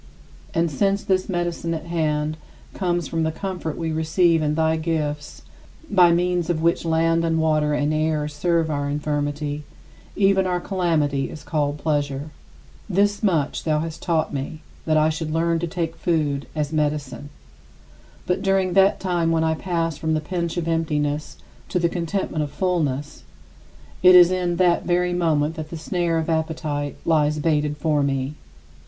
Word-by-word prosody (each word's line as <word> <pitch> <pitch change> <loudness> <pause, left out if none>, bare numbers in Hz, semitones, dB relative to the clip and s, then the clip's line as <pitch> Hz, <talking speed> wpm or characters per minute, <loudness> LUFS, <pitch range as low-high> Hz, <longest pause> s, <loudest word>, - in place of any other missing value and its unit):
And 165 -1 +1
since 195 +7 +1
this 185 +1 0
medicine 175 -2 -2
at 160 - -6
hand 155 -2 -1 0.4
comes 175 -4 -1
from 165 +4 -2
the 160 0 +1
comfort 175 -2 -4
we 165 -1 -2
receive 160 +1 +2
in 150 0 0
thy 160 0 +2
gifts 155 -2 -3 0.5
(by 180 -4 +6
means 175 0 +1
of 170 -2 +1
which 170 +1 +1
land 165 0 +2
and 165 -1 +1
water 155 -2 +2
and 145 +1 0
air 155 -1 0
serve 160 +2 0
our 145 -1 -1
infirmity), 145 0 -2 0.5
even 195 -1 +3
our 180 -1 0
calamity 160 -8 0
is 155 - -9
called 145 -2 -1
pleasure. 145 -1 -2 0.6
44. 195 - -5
This 205 +1 +2
much 165 -9 0
thou 155 -1 +1
hast 165 0 -6
taught 160 -3 0
me: 140 +3 -4 0.3
that 155 -1 +3
I 155 0 +4
should 155 0 -3
learn 165 +1 +1
to 170 - -2
take 165 -2 -3
food 145 -6 -1
as 150 0 -2
medicine. 145 -2 -2 1.0
But 180 - 0
during 195 -2 +1
that 195 +1 +4
time 175 -3 0
when 165 -1 +2
I 160 0 +2
pass 165 -1 -2
from 160 0 0
the - - +1
pinch 170 +1 -3
of 170 -1 -2
emptiness 150 - -1 0.3
to - - 0
the 170 -1 +2
contentment 170 -1 -2
of 150 - -2
fullness, 150 -6 -1 0.8
it 185 0 +8
is 175 0 +8
in 180 -1 0
that 175 -1 +3
very 180 0 +1
moment 160 -3 +1
that 155 -1 -5
the 165 - -6
snare 170 +1 -1
of 160 -1 -1
appetite 155 -3 -2
lies 155 -2 +2
baited 150 -1 0
for 150 -1 +1
me. 135 0 -1
160 Hz, 170 wpm, -23 LUFS, 150-175 Hz, 1.0 s, it